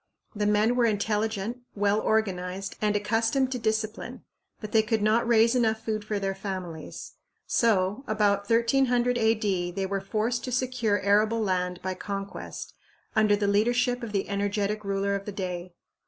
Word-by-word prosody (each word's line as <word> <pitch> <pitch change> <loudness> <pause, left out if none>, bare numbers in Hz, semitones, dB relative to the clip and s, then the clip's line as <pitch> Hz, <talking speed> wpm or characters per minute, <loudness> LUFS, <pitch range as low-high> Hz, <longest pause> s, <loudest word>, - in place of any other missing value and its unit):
The 210 0 0
men 210 +3 +3
were 245 -1 +3
intelligent, 215 +1 -1 0.2
well 205 +1 +2
organized, 195 -3 -1
and 210 -1 +1
accustomed 225 +5 +1
to 250 - -2
discipline, 220 0 -2 0.4
but 215 -1 -7
they 220 - +5
could 220 -1 0
not 225 +2 +3
raise 230 0 +5
enough 225 -3 +1
food 215 -1 -2
for 210 0 -2
their 195 -1 -1
families; 185 -5 -6 0.3
so, 210 0 +1
about 205 -2 +1
1300 245 +1 +3
A.D., 210 -5 +1
they 190 +2 -3
were 195 0 -2
forced 220 +4 -1
to 255 - -4
secure 250 -5 0
arable 215 +3 +3
land 180 -2 -1
by 185 0 -1
conquest, 195 +1 -6 0.4
under 215 -1 +4
the 205 0 -1
leadership 245 +5 +2
of 230 -3 -5
the 200 -2 -1
energetic 205 +1 -1
ruler 200 0 0
of 200 0 -3
the 205 - -4
day. 180 -2 -5
210 Hz, 160 wpm, -27 LUFS, 200-225 Hz, 0.4 s, they